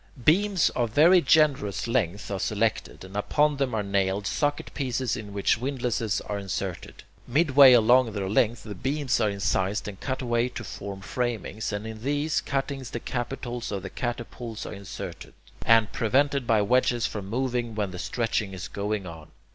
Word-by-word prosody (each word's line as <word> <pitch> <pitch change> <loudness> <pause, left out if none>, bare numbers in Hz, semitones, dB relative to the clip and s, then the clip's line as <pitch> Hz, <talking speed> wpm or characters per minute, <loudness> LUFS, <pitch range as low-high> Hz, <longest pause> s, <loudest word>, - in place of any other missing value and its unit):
Beams 195 +2 +3
of 120 -2 -1
very 170 +4 +7
generous 145 - +2
length 100 -5 -1
are 100 - -2
selected, 110 -1 -1
and 95 +1 -12
upon 145 +8 +2
them 135 -4 0
are 105 - 0
nailed 100 0 0
socket 145 +8 -1
pieces 130 -3 -1
in 105 -4 -7
which 100 +2 +1
windlasses 120 -5 -1
are 105 -1 -4
inserted. 100 -2 -5 0.2
Midway 140 -1 +7
along 120 +1 +5
their 100 -2 -2
length 115 +3 +1
the 105 - -6
beams 135 +5 -1
are 110 - +3
incised 100 0 -1
and 100 -2 -7
cut 130 0 -3
away 120 0 +1
to - - -7
form 100 -1 -7
framings, 115 -1 -3
and 105 +1 -4
in 110 -1 -7
these 145 +4 0
cuttings 135 -2 -3
the 120 - -4
capitals 120 -1 -4
of 100 -2 -3
the 95 - -6
catapults 120 -2 -5
are - - -6
inserted, 100 -1 -8 0.3
and 115 -2 +5
prevented 135 +3 +1
by 110 -2 +3
wedges 120 +1 +2
from 100 -3 -4
moving 120 -1 -1
when 105 -3 -1
the 90 - -7
stretching 115 -3 -1
is 90 - -6
going 100 -1 -3
on. 80 -3 -9
115 Hz, 170 wpm, -26 LUFS, 100-130 Hz, 0.3 s, very